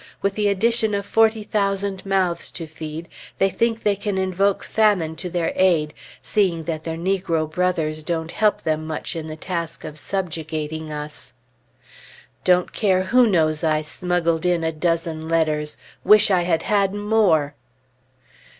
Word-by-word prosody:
With 200 Hz, 0 st, +1 dB
the 210 Hz, 0 st, 0 dB
addition 220 Hz, +2 st, +1 dB
of 200 Hz, 0 st, -2 dB
forty 220 Hz, 0 st, +3 dB
thousand 195 Hz, -2 st, -1 dB
mouths 185 Hz, -3 st, 0 dB
to 165 Hz, -, -6 dB
feed, 160 Hz, +1 st, -7 dB, 0.3 s
they 195 Hz, 0 st, +2 dB
think 230 Hz, +1 st, 0 dB
they 205 Hz, -1 st, +3 dB
can 200 Hz, 0 st, -3 dB
invoke 190 Hz, +1 st, +1 dB
famine 200 Hz, -8 st, +2 dB
to 180 Hz, -, -5 dB
their 170 Hz, -1 st, -1 dB
aid, 165 Hz, -5 st, +2 dB, 0.3 s
seeing 180 Hz, -6 st, +1 dB
that 160 Hz, -1 st, -4 dB
their 165 Hz, -1 st, -3 dB
negro 175 Hz, -3 st, 0 dB
brothers 160 Hz, -2 st, -1 dB
don't 160 Hz, +1 st, -3 dB
help 215 Hz, -1 st, +1 dB
them 155 Hz, 0 st, -1 dB
much 155 Hz, +1 st, -4 dB
in 160 Hz, -1 st, -5 dB
the 155 Hz, -, -6 dB
task 170 Hz, 0 st, -4 dB
of 155 Hz, 0 st, -7 dB
subjugating 160 Hz, -3 st, -4 dB
us. 150 Hz, -3 st, -7 dB, 1.1 s
Don't 180 Hz, 0 st, +3 dB
care 190 Hz, -4 st, +2 dB
who 240 Hz, +5 st, +4 dB
knows 155 Hz, -6 st, +1 dB
I 155 Hz, -1 st, +2 dB
smuggled 170 Hz, 0 st, -1 dB
in 175 Hz, -2 st, +1 dB
a 160 Hz, -, 0 dB
dozen 165 Hz, 0 st, -1 dB
letters! 155 Hz, -2 st, 0 dB, 0.3 s
Wish 210 Hz, -1 st, +6 dB
I 185 Hz, -2 st, +4 dB
had 165 Hz, -2 st, 0 dB
had 200 Hz, -2 st, +1 dB
more! 205 Hz, -9 st, +2 dB
175 Hz, 155 wpm, -22 LUFS, 160-200 Hz, 1.1 s, Wish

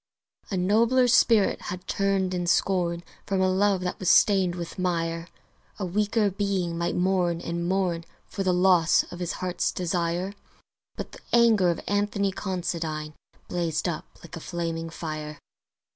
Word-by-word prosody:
A 195 Hz, -, -2 dB
nobler 230 Hz, +7 st, +3 dB
spirit 230 Hz, -4 st, +4 dB
had 180 Hz, +1 st, -6 dB
turned 195 Hz, -2 st, 0 dB
in 175 Hz, -1 st, -2 dB
scorn 175 Hz, -2 st, +1 dB, 0.2 s
From 195 Hz, -1 st, 0 dB
a 190 Hz, -, +3 dB
love 190 Hz, 0 st, +2 dB
that 180 Hz, 0 st, -3 dB
was 185 Hz, -, 0 dB
stained 190 Hz, -4 st, +4 dB
with 170 Hz, +1 st, -7 dB
mire; 165 Hz, -2 st, -1 dB, 0.5 s
A 200 Hz, -, -3 dB
weaker 210 Hz, +3 st, +1 dB
being 190 Hz, -4 st, -1 dB
might 170 Hz, +1 st, -1 dB
mourn 180 Hz, -2 st, +1 dB
and 170 Hz, +1 st, -3 dB
mourn 180 Hz, -3 st, 0 dB, 0.2 s
For 200 Hz, -, -6 dB
the 190 Hz, -1 st, +2 dB
loss 180 Hz, -2 st, +4 dB
of 175 Hz, -, -8 dB
his 175 Hz, -1 st, -2 dB
Heart's 180 Hz, -1 st, -1 dB
Desire: 175 Hz, +1 st, -1 dB, 0.6 s
But -, -, -6 dB
the -, -, -12 dB
anger 225 Hz, -6 st, +5 dB
of 170 Hz, -, -1 dB
Anthony 205 Hz, -1 st, 0 dB
Considine 170 Hz, -5 st, -3 dB, 0.3 s
Blazed 170 Hz, -2 st, -1 dB
up 170 Hz, -3 st, -4 dB, 0.2 s
like 170 Hz, +1 st, -10 dB
a -, -, -6 dB
flaming 165 Hz, -1 st, -4 dB
fire. 155 Hz, -2 st, -6 dB
180 Hz, 155 wpm, -26 LUFS, 170-195 Hz, 0.6 s, anger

